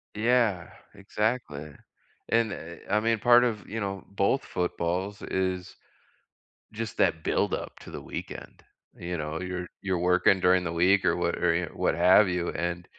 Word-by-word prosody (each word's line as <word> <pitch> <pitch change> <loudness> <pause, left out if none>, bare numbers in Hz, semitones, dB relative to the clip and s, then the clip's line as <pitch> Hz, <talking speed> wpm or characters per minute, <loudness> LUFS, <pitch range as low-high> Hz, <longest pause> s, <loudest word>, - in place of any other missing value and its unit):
Yeah, 110 -5 +1 0.3
exactly. 100 - -3 0.6
And, 115 -2 +2
eh 85 +1 -9
I 105 +1 +3
mean, 115 0 +1
part 120 +2 +6
of, 110 -4 -2
you 115 +2 -4
know, 100 -2 -4
both 100 +7 +1
footballs, 90 +3 -2
is 95 -1 -2 1.0
just 110 0 -5
that 80 0 +1
buildup - - -1
to - - -12
the - - -7
weekend. - - -8 0.3
You 85 0 -4
know, 75 +1 -4
you're 90 -1 -4
you're 95 -3 -1
working 90 +2 +3
during 90 0 +4
the 85 - -3
week 95 +4 +3
or - - +3
what - - -1
or 90 -1 +2
y 85 +1 0
wh - - -15
what - - +1
have 90 +4 +6
you, 90 -1 -1
and 85 +1 -3
95 Hz, 165 wpm, -27 LUFS, 85-105 Hz, 1.0 s, part